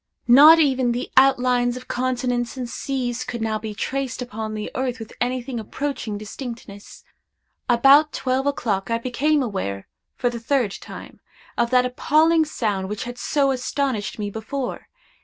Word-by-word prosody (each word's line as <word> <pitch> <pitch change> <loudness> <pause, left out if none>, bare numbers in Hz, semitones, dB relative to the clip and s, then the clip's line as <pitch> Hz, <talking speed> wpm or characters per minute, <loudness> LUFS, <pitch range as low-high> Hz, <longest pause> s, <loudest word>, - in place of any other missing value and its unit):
Not 290 +7 +9
even 260 -6 +2
the 245 - -4
outlines 250 -2 +3
of 255 - -11
continents 245 -1 -1
and 250 -2 -4
seas 245 -1 -3
could 245 -1 -5
now 220 -1 -1
be 215 -1 -6
traced 265 +3 -3
upon 220 -3 -5
the 210 0 -5
earth 255 -1 -2
with 225 -2 -9
anything 250 0 -2
approaching 240 -1 -4
distinctness. 215 -1 -9 0.7
About 275 +5 +6
twelve 260 +1 -1
o'clock 215 -8 -1
I 230 - +1
became 270 +5 +1
aware, 100 - -4 0.3
for 245 -3 0
the 235 - -5
third 240 -2 0
time, - - -10 0.4
of 235 0 +1
that 250 0 +4
appalling 315 +6 +3
sound 205 -9 -2
which 210 0 -4
had 245 0 -7
so 280 -2 +1
astonished 260 -3 -2
me 205 -1 -4
before. 245 +5 -5
245 Hz, 155 wpm, -22 LUFS, 225-270 Hz, 0.7 s, Not